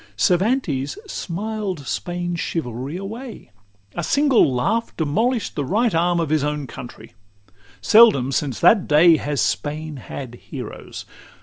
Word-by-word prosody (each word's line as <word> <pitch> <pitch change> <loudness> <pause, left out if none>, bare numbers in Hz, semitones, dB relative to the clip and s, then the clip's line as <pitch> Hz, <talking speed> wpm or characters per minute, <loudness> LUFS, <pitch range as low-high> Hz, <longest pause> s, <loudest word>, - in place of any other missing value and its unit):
XI - - -24 0.2
Cervantes 180 - +1
smiled 200 - -4
Spain's 175 +1 -3
chivalry 130 0 -4
away; 225 - -8 0.4
A 175 - -4
single 275 - +3
laugh 210 - -1
demolish'd 220 - 0
the 145 - -2
right 220 - +1
arm 170 +1 +2
Of 165 -3 -1
his 155 -2 +2
own 150 -1 -2
country; 120 -1 -11 0.7
seldom 205 - +6
since 135 -2 -1
that 210 -5 +5
day 160 +2 +6
Has 145 -2 -2
Spain 150 0 -2
had 130 -1 -8 0.2
heroes. - - -8
170 Hz, 130 wpm, -21 LUFS, 145-215 Hz, 0.7 s, seldom